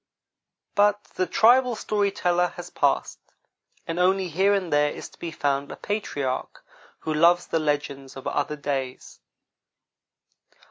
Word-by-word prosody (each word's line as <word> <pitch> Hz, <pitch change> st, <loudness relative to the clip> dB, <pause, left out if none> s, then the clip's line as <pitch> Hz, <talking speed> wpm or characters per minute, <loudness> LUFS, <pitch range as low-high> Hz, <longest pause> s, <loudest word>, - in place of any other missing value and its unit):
But 205 Hz, 0 st, +3 dB
the 185 Hz, -, -1 dB
tribal 245 Hz, +3 st, +4 dB
story 205 Hz, -2 st, 0 dB
teller 180 Hz, -2 st, 0 dB
has 175 Hz, 0 st, -8 dB
passed, -, -, 0 dB, 0.7 s
and 165 Hz, +1 st, -3 dB
only 185 Hz, 0 st, +2 dB
here 190 Hz, +5 st, +2 dB
and 190 Hz, -5 st, 0 dB
there 145 Hz, 0 st, +4 dB
is -, -, -8 dB
to -, -, -21 dB
be 170 Hz, -, -4 dB
found 140 Hz, -2 st, -1 dB
a -, -, -6 dB
patriarch 145 Hz, -11 st, -3 dB, 0.4 s
who 155 Hz, -, -2 dB
loves 170 Hz, +3 st, +4 dB
the 165 Hz, -, 0 dB
legends 145 Hz, -3 st, -2 dB
of 135 Hz, -, -9 dB
other 145 Hz, +1 st, -1 dB
days. 135 Hz, -3 st, -4 dB
170 Hz, 140 wpm, -25 LUFS, 145-195 Hz, 0.7 s, tribal